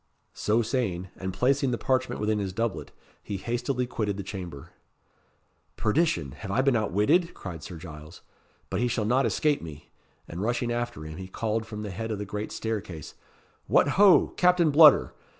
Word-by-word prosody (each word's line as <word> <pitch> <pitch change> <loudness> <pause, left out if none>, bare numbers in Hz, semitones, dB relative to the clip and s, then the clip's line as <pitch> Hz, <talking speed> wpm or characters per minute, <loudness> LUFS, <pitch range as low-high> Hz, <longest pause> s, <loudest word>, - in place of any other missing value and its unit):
So 110 +3 +1
saying, 100 -7 -2
and 95 0 -4
placing 135 +6 +1
the 120 - -1
parchment 130 +1 0
within 105 0 0
his 95 -2 -3
doublet, 115 0 -2 0.3
he 100 - -5
hastily 120 +4 -2
quitted 105 -5 -2
the 100 - -4
chamber. 90 -7 -8 1.1
"Perdition! 105 - +1
have 100 +9 -9
I 120 +7 +1
been 135 -2 +3
outwitted?" 110 - +2
cried 85 -5 -7
Sir 85 - -8
Giles. 80 -1 -11 0.5
"But - - -1
he 125 - +2
shall 115 -2 -1
not 125 +5 +2
escape 150 -2 +1
me." 75 -2 -10 0.4
And 85 +3 -6
rushing 120 +2 -1
after 120 -6 -3
him, 80 0 -8
he 95 0 -7
called 110 +3 -2
from 105 -1 -6
the 105 - -5
head 110 +5 -5
of 110 - -2
the 105 - -4
great 105 +1 -5
staircase 100 -9 -5 0.5
"What, - - +4
ho! 200 -2 +6
Captain 180 -3 +4
Bludder! 150 -1 +7
110 Hz, 175 wpm, -27 LUFS, 95-125 Hz, 1.1 s, Bludder